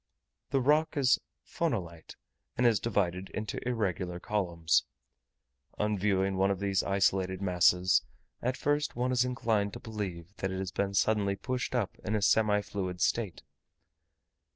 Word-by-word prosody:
The 135 - +1
rock 155 +4 +2
is 135 -2 +4 0.3
phonolite, 90 - -3 0.4
and 125 - +2
is 115 -4 +4
divided 95 -4 -1
into 105 -1 -3
irregular 95 -7 -1
columns. 85 -6 +1 0.9
On 105 0 +1
viewing 95 -1 +1
one 95 +1 +3
of 100 -2 -1
these 100 -1 +1
isolated 95 -1 +1
masses, 90 -1 +3 0.4
at 125 +2 -1
first 145 +1 0
one 125 +1 0
is 125 -1 +3
inclined 110 -5 0
to - - -7
believe 100 -5 -6
that 95 - -2
it 95 - -4
has 95 -1 -3
been 100 +1 -1
suddenly 100 -1 +2
pushed 125 +3 -3
up 115 -6 -1
in 110 - -1
a 105 - 0
semi 105 -1 +4
fluid 95 -3 -4
state. 105 -2 0
100 Hz, 150 wpm, -30 LUFS, 95-115 Hz, 0.9 s, is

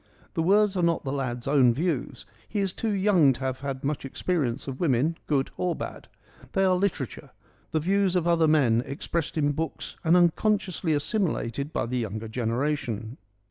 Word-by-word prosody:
The 165 - 0
words 200 +3 +3
are 180 - +1
not 170 -1 +1
the 135 - -3
lad's 125 -3 -3
own 130 -4 +4
views: 155 -3 -2 0.2
he 210 - -2
is 195 -2 0
too 225 - -2
young 190 -8 +4
to 130 - -11
have 130 -1 -2
had 135 -1 -5
much 145 +1 -2
experience 135 -2 -2
of 135 -1 -5
women, 155 0 +2
good 140 -3 +1
or 180 -1 0
bad: - - -7 0.5
they 195 - +2
are 185 -1 +4
literature, 180 - -2 0.4
the 160 - 0
views 190 +3 +1
of 175 -2 +1
other 165 -2 +4
men 130 -7 +4
expressed 150 +4 -3
in 145 -1 +2
books 160 +3 -4
and 170 +2 +5
unconsciously 180 -1 +2
assimilated 145 - -1
by - - -1
the 125 +1 -2
younger 110 0 -4
generation. 120 0 -2
150 Hz, 180 wpm, -26 LUFS, 130-180 Hz, 0.5 s, and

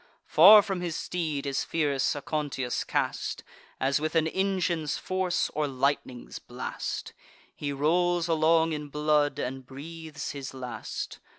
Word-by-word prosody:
Far 210 -1 +9
from 195 -3 -3
his 170 -3 -3
steed 155 -6 -3
is 135 -1 -1
fierce 145 -5 0
Aconteus 145 -3 -2
cast, - - -2 0.4
As 135 +2 +2
with 155 +2 -2
an 160 -1 +4
engine's 175 -3 0
force, 185 -1 -1
or 150 0 0
lightning's 130 -2 -2
blast: - - -5 0.4
He 145 -1 -3
rolls 170 +4 +2
along 160 0 +3
in 150 -1 -4
blood, 150 0 +1
and 130 +1 -4
breathes 155 +3 -7
his 135 -2 -7
last. 125 -2 -6
155 Hz, 130 wpm, -28 LUFS, 140-170 Hz, 0.4 s, Far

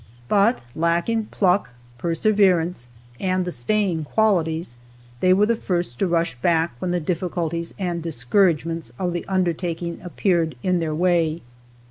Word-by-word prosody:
But 205 - +3
lacking 170 +7 +1
pluck, 195 -4 +1 0.3
perseverance 175 - +2 0.3
and 185 -1 0
the 180 - -3
staying 170 - +1
qualities, 165 - +1 0.4
they 185 - +3
were 195 +3 +5
the 230 +2 +2
first 175 - -2
to 195 - +2
rush 170 -3 +1
back 165 -1 +2
when 180 - -2
the 175 0 +1
difficulties 170 0 -3
and 175 -3 -2
discouragements 165 - +1
of 180 -2 -1
the 175 - -4
undertaking 175 -2 -1
appeared 170 -3 0
in 180 -1 +2
their 160 -2 -2
way. 170 -2 +1
175 Hz, 135 wpm, -22 LUFS, 165-185 Hz, 0.4 s, were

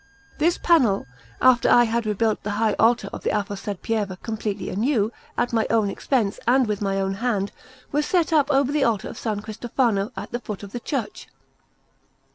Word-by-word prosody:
This 335 +3 +3
panel, 255 - +3 0.4
after 255 -2 +5
I 240 - +7
had 230 -1 -1
rebuilt 215 +1 0
the 210 - -4
high 220 -1 +2
altar 225 -3 +3
of - - -6
the - - -1
aforesaid 205 -1 -3
Pieve 205 -4 -1
completely 215 -3 -3
anew, 220 +1 +1 0.3
at 240 0 0
my 225 -1 +2
own 220 -3 +2
expense 220 -3 -1
and 255 +1 +4
with 210 -2 -2
my 195 -1 0
own 195 0 0
hand, 205 -2 -1 0.4
was 295 +1 0
set 345 -3 +1
up 295 -2 +3
over 275 -1 +2
the 295 -1 +2
altar 225 -6 0
of - - -9
S. 215 -3 -1
Cristofano 220 0 -1
at - - -6
the 240 - -2
foot 210 -3 -7
of 200 - -9
the 245 - -4
church. 275 - -4
225 Hz, 190 wpm, -23 LUFS, 205-250 Hz, 0.4 s, I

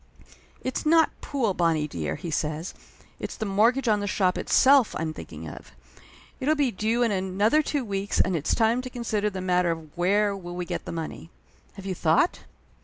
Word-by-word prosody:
"It's 260 - -2
not 320 0 +4
pool, 245 -8 -1
Bonnie 165 -4 +1
dear," 80 - -3
he 170 -3 -6
says. 155 +3 -2 0.5
"It's - - -5
the 220 - -4
mortgage 230 +6 +2
on 210 -2 +3
the 205 - -3
shop 185 -2 +1
itself 270 -3 +4
I'm 160 -1 -2
thinking - - -9
of. - - -11 0.7
It'll 300 +4 +2
be 285 -4 +1
due 225 +5 0
in 230 - +2
another 200 +8 +2
two 290 -3 -2
weeks 200 -1 -2
and 185 - +2
it's 155 -2 0
time 230 +2 +2
to 255 - -7
consider 220 -4 -1
the 195 - -7
40 185 - -5
Laughter 180 0 +3
Limited 165 - 0
matter 160 -1 -14
of - - -29
where 200 +3 +2
will 175 -2 -8
we 180 0 -3
get - - -4
the - - -5
money. 165 0 -6 0.4
Have 195 -1 -11
you 190 - -2
thought?" 170 - +2
200 Hz, 205 wpm, -26 LUFS, 175-235 Hz, 0.7 s, not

